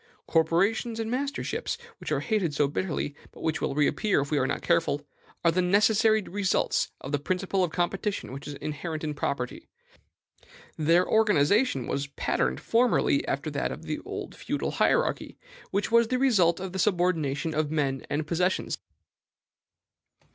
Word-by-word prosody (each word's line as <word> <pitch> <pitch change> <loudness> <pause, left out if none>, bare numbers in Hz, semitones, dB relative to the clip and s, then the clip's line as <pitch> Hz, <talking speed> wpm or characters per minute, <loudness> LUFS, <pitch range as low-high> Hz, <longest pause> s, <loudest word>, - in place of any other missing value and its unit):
Corporations 195 +8 +1
and 225 0 -2
masterships, 275 +3 -2 0.2
which - - -6
are - - +1
hated 195 -9 0
so 145 - +3
bitterly, 150 -1 -2 0.2
but - - -12
which 160 +1 -1
will 135 - -1
reappear 150 +7 +2
if 140 +1 -3
we 150 - +2
are 130 - +1
not - - -3
careful, 165 -4 +1 0.4
are 170 - +6
the 185 +2 +1
necessary 215 +3 +4
results 195 0 0
of 135 - -6
the 145 - +1
principle 185 +4 0
of 175 - -1
competition 195 +2 -2
which 140 +2 -8
is 145 - -5
inherent 155 +2 -5
in 150 -1 -2
property; 140 -3 -3 1.1
their 165 +4 +3
organization 210 - +3
was 140 0 -2
patterned 65 - -1
formerly 240 +2 +2
after - - -2
that - - -1
of - - -7
the - - -3 0.3
feudal - - -3
hierarchy, - - +1 0.3
which 200 +3 -1
was 235 0 +5
the 255 - 0
result 195 -11 +3
of 185 -1 -5
the 190 - -3
subordination 165 -6 +1
of 150 -1 0
men 140 -4 -1
and 150 +1 -1
possessions. 180 +4 0
175 Hz, 155 wpm, -27 LUFS, 150-205 Hz, 1.1 s, are